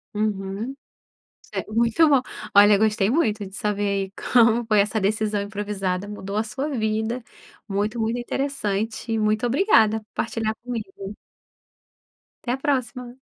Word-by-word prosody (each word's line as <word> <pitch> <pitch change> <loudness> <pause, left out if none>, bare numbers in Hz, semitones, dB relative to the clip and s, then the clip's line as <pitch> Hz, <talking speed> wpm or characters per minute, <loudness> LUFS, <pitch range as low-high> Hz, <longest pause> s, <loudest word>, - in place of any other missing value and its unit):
Uhum. 210 +3 -2 0.7
Cer - - -5
muito 230 +8 +3
bom. 280 -3 +5 0.3
Olha, 205 0 +8
gostei 210 -1 +2
muito 215 -9 +1
de 190 - -12
saber, 210 0 -1
aí, 195 -1 -1 0.2
como 235 -1 +5
foi 215 -2 +4
essa 215 +2 +1
decisão 210 +1 0
improvisada 200 -2 -3
mudou 205 -1 -6
a 215 - +2
sua 265 +6 -4
vida. 220 -1 -1 0.5
Muito 210 +4 -1
muito 225 +2 0
interessante 230 -4 -2
e 225 - +1
muito 215 +2 +1
obrigada 235 - +4
por 215 - -26
partilhar 225 -1 -1
comigo. 210 -5 -6 1.3
Até 240 - -1
a - - -1
próxima. 255 -3 -2
215 Hz, 140 wpm, -24 LUFS, 205-240 Hz, 1.3 s, Olha